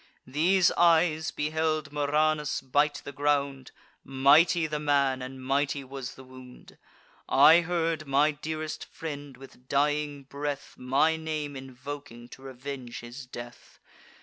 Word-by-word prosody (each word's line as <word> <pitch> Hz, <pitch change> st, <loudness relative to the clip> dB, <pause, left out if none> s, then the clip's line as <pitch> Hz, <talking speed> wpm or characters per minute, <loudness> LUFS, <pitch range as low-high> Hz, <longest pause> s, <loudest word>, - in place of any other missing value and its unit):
These 170 Hz, +7 st, +3 dB
eyes 165 Hz, -2 st, +3 dB
beheld 155 Hz, 0 st, -1 dB
Murranus 150 Hz, +1 st, +1 dB
bite 145 Hz, +2 st, 0 dB
the -, -, -6 dB
ground: 140 Hz, -2 st, -1 dB, 0.3 s
Mighty 150 Hz, +6 st, +4 dB
the 150 Hz, -1 st, -3 dB
man, 140 Hz, -3 st, +1 dB
and 130 Hz, 0 st, -8 dB
mighty 140 Hz, +1 st, 0 dB
was 135 Hz, -1 st, -7 dB
the 130 Hz, -, -12 dB
wound. 130 Hz, -1 st, -14 dB, 0.5 s
I 155 Hz, +5 st, +7 dB
heard 165 Hz, -2 st, -1 dB
my 140 Hz, +3 st, +3 dB
dearest 155 Hz, +1 st, -5 dB
friend, 145 Hz, -4 st, -8 dB
with 130 Hz, -1 st, -15 dB
dying 145 Hz, 0 st, 0 dB
breath, 145 Hz, +1 st, -5 dB
My 140 Hz, +6 st, +2 dB
name 155 Hz, -2 st, -4 dB
invoking 130 Hz, -2 st, -9 dB
to 130 Hz, -, -13 dB
revenge 130 Hz, -2 st, -7 dB
his 120 Hz, +2 st, -9 dB
death. 120 Hz, -1 st, -11 dB
145 Hz, 125 wpm, -28 LUFS, 135-155 Hz, 0.5 s, I